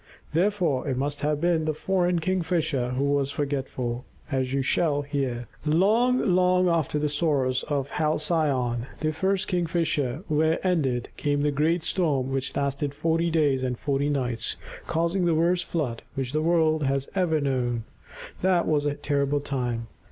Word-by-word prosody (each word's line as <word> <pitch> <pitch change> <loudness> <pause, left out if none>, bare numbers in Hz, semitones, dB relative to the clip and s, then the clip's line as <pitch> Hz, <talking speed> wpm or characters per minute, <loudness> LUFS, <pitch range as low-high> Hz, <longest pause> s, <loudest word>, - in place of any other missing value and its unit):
Therefore 175 -6 +1
it 130 -2 -1
must 145 +2 -2
have 150 0 0
been 165 -1 +1
the 155 -1 -1
foreign 180 +1 +1
Kingfisher 165 -7 0
who 130 +2 -1
was 140 -1 +1
forgetful, 135 -4 -3 0.3
as 130 -2 0
you 135 0 0
shall 145 +1 +1
hear. 135 -5 -2 0.2
Long, 215 +11 +3
long 180 0 +4
after 165 -3 +1
the 150 0 +1
sorrows 140 -4 +1
of 140 -2 -2
Halcyone, 150 -6 0
the 155 0 0
first 190 +4 0
Kingfisher, 165 -5 0
were 160 +2 +2
ended, 140 -10 0
came 145 -1 0
the 150 - +2
great 155 +4 +1
storm 140 -8 0
which 135 0 -2
lasted 140 0 -1
forty 165 +2 +1
days 145 -5 +2
and 125 -2 -1
forty 140 +2 0
nights, 125 -5 -1 0.3
causing 170 +3 0
the 170 -2 +3
worst 175 +2 +2
flood 130 -9 -2
which 130 -2 -2
the 155 - +1
world 160 -1 +2
has 135 -1 0
ever 175 -5 +1
known. 125 -4 -1 0.6
That 185 -2 +3
was 150 -1 +2
a 145 - -1
terrible 145 0 0
time. 125 -5 -2
150 Hz, 160 wpm, -26 LUFS, 135-170 Hz, 0.6 s, long